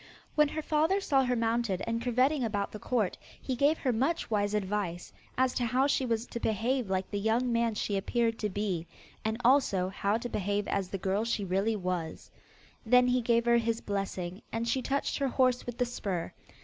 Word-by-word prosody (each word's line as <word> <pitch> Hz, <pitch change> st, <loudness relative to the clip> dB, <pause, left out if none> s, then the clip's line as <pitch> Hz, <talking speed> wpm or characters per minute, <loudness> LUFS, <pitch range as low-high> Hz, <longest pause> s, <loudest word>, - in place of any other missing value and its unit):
When 300 Hz, -1 st, +4 dB
her 310 Hz, +2 st, -4 dB
father 315 Hz, +7 st, +2 dB
saw 275 Hz, -8 st, +2 dB
her 250 Hz, 0 st, +1 dB
mounted 230 Hz, -4 st, 0 dB
and 230 Hz, 0 st, -2 dB
curvetting 255 Hz, +4 st, +2 dB
about 205 Hz, -3 st, -1 dB
the 215 Hz, -, -7 dB
court, 220 Hz, -7 st, -1 dB, 0.2 s
he 260 Hz, -, -3 dB
gave 285 Hz, +5 st, +3 dB
her 255 Hz, -3 st, 0 dB
much 270 Hz, +5 st, 0 dB
wise 205 Hz, -1 st, +1 dB
advice, 195 Hz, -4 st, -2 dB, 0.2 s
as 260 Hz, 0 st, +2 dB
to 245 Hz, -, 0 dB
how 255 Hz, +4 st, +2 dB
she 275 Hz, -2 st, +1 dB
was 230 Hz, 0 st, 0 dB
to 235 Hz, -, -6 dB
behave 230 Hz, +2 st, 0 dB
like 190 Hz, 0 st, -1 dB
the 205 Hz, -, -1 dB
young 230 Hz, +4 st, +1 dB
man 230 Hz, -1 st, +1 dB
she 205 Hz, -, -1 dB
appeared 225 Hz, +3 st, 0 dB
to 210 Hz, -, -1 dB
be, 190 Hz, -4 st, -2 dB, 0.4 s
and 220 Hz, +1 st, -1 dB
also 235 Hz, -9 st, +3 dB
how 200 Hz, +2 st, 0 dB
to 235 Hz, -, -5 dB
behave 205 Hz, -2 st, -1 dB
as 195 Hz, -2 st, -1 dB
the 195 Hz, -, -3 dB
girl 195 Hz, +3 st, 0 dB
she 225 Hz, -3 st, -1 dB
really 195 Hz, +4 st, +1 dB
was. 180 Hz, -4 st, -4 dB, 0.5 s
Then 250 Hz, +2 st, +5 dB
he 250 Hz, 0 st, +2 dB
gave 235 Hz, 0 st, +2 dB
her 235 Hz, 0 st, +5 dB
his 230 Hz, -1 st, 0 dB
blessing, 195 Hz, -1 st, -4 dB
and 230 Hz, +1 st, -2 dB
she 260 Hz, +3 st, +1 dB
touched 280 Hz, +3 st, -1 dB
her 275 Hz, -, +1 dB
horse 255 Hz, -1 st, +1 dB
with 245 Hz, -1 st, -5 dB
the 245 Hz, -, +2 dB
spur. 190 Hz, -8 st, -4 dB
230 Hz, 205 wpm, -30 LUFS, 200-250 Hz, 0.5 s, Then